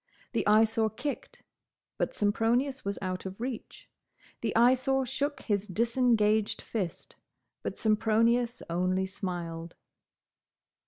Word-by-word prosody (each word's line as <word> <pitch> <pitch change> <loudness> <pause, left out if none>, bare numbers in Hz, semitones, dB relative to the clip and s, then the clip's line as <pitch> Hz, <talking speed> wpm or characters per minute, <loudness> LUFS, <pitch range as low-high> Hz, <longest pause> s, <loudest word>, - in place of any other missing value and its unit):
The - - -1
Eyesore 220 +1 +4
kicked; 280 +6 -6 0.6
but - - -1
Sempronius 235 +6 +1
was 200 0 -2
out 185 0 -3
of 190 +2 -9
reach. 245 -1 -6 0.5
The - - 0
Eyesore 260 +3 +4
shook 275 +2 -2
his 205 -2 0
disengaged 220 0 +2
fist; 190 -7 -5 0.4
but - - -4
Sempronius 230 +2 +2
only 185 +2 0
smiled. 175 -3 -5
220 Hz, 105 wpm, -29 LUFS, 190-245 Hz, 0.6 s, Eyesore